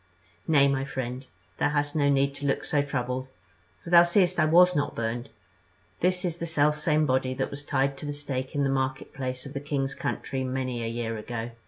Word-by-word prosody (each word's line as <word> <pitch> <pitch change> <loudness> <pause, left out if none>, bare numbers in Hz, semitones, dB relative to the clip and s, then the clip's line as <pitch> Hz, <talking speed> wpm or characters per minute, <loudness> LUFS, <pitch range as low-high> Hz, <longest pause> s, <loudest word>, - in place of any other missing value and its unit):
"Nay, 140 -3 +5
my 135 -1 0
friend, 130 -1 -5 0.3
thou - - +3
hast 145 0 -1
no 145 -2 +3
need 140 0 +2
to 140 0 -4
look 135 - 0
so 145 - +2
troubled; 130 -2 -3 0.6
for 170 - -8
thou 170 -1 +9
seest 175 +1 +3
that 175 - +2
I - - +4
was 180 +2 +6
not 145 0 0
burned. 115 +1 -3 0.7
This 180 +1 +1
is 175 -1 -3
the 170 - -3
selfsame 150 0 +2
body 130 -1 +1
that 135 - -2
was 140 +1 -7
tied 135 -1 0
to 150 - -6
the - - -2
stake 135 -2 -4
in 145 - +2
the 135 - +1
market 130 -1 -2
place 130 -1 -4
of 140 - -8
the 140 - -3
king's 140 -1 -2
city 135 -1 -3
many 130 -2 -2
a - - -2
year 115 -1 -3
ago. 120 +1 -5
140 Hz, 215 wpm, -27 LUFS, 130-150 Hz, 0.7 s, thou